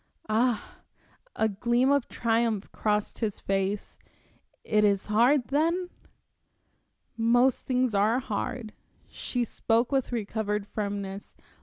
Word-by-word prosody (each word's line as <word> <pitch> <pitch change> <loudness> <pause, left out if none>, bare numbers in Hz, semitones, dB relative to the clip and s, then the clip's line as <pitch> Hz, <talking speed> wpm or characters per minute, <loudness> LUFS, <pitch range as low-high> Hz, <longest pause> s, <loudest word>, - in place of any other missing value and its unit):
"Ah!" 230 +1 0 0.6
A 220 - +2
gleam 240 +6 +1
of 280 -3 +2
triumph 225 -3 0
crossed 210 -1 -1
his 215 -4 -2
face. 195 +1 -2 0.6
"It 210 -1 +2
is 200 -2 +2
hard, 240 +5 +3
then?" 335 +6 +1 1.2
"Most 240 +3 +2
things 255 -2 +1
are 210 +4 +3
hard." 240 -2 -4 0.3
She 245 -1 -3
spoke 230 +2 0
with 270 -2 0
recovered 210 -2 -2
firmness. 200 -1 -5
225 Hz, 110 wpm, -27 LUFS, 210-250 Hz, 1.2 s, hard